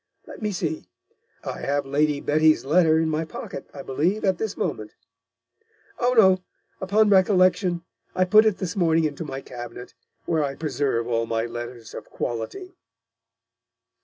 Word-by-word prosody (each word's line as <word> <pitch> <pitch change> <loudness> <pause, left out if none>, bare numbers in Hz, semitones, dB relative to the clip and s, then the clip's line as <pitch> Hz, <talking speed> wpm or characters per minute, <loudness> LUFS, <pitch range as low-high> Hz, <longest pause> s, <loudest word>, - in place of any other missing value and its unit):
Let - - -11
me 210 -1 -1
see, 160 - -4 0.5
I - - -5
have 140 0 -1
Lady 145 +1 +1
Betty's 155 0 +3
Letter 160 +1 +4
in 160 0 +1
my 155 0 -1
Pocket, 155 -3 -8
I 140 - -9
believe, 175 +12 0
at 190 -3 +1
this 220 -3 -3
Moment. 105 0 -4 1.0
Oh 250 +1 +2
no, 190 -4 +6 0.4
upon 205 +2 +3
Recollection, 185 -2 +3 0.3
I 185 - +3
put 215 +4 +6
it 210 - +1
this 180 -3 -4
morning 165 -3 +2
into 150 0 -2
my 135 -3 -6
Cabinet, 120 -1 -9 0.3
where 160 -2 +1
I 135 -1 -3
preserve 135 -6 -1
all 115 -1 0
my 115 0 -1
Letters 120 -1 -8
of - - -9
Quality.' 120 - -5
160 Hz, 155 wpm, -24 LUFS, 135-185 Hz, 1.0 s, no